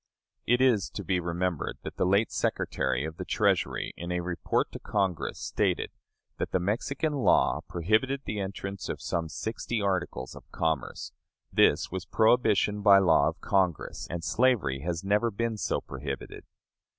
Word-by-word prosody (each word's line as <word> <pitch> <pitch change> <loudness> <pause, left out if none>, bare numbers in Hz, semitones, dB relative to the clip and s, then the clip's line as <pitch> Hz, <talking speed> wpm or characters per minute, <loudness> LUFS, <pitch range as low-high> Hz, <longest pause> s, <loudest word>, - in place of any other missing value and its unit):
It 120 +2 +3
is 120 -8 +3
to 100 - -4
be 90 0 +1
remembered 85 -1 -2
that - - -7
the - - +2
late 100 +4 +3
Secretary 65 +2 -1
of 80 0 -6
the - - -4
Treasury, - - 0
in 85 +1 -5
a 90 0 0
report 85 -1 -1
to - - -7
Congress, 95 -5 -1
stated - - -1 0.5
that - - -1
the 95 - +2
Mexican 125 - -1
law 140 -3 +3
prohibited 110 +10 +1
the 105 - -3
entrance 95 -2 -5
of - - -3
some 85 -2 -2
sixty 110 +5 -3
articles 95 -10 -2
of - - -13
commerce; 80 -4 -2 0.4
this - - +4
was 95 0 -4
prohibition 110 -3 +3
by 100 -1 +8
law 90 -5 +4
of - - -10
Congress, 95 -5 0
and 85 0 -4
slavery 110 - +2
has 85 +3 -3
never 105 +4 +2
been 115 +2 -2
so 105 - -1
prohibited. 70 -2 -6
95 Hz, 160 wpm, -28 LUFS, 85-110 Hz, 0.5 s, by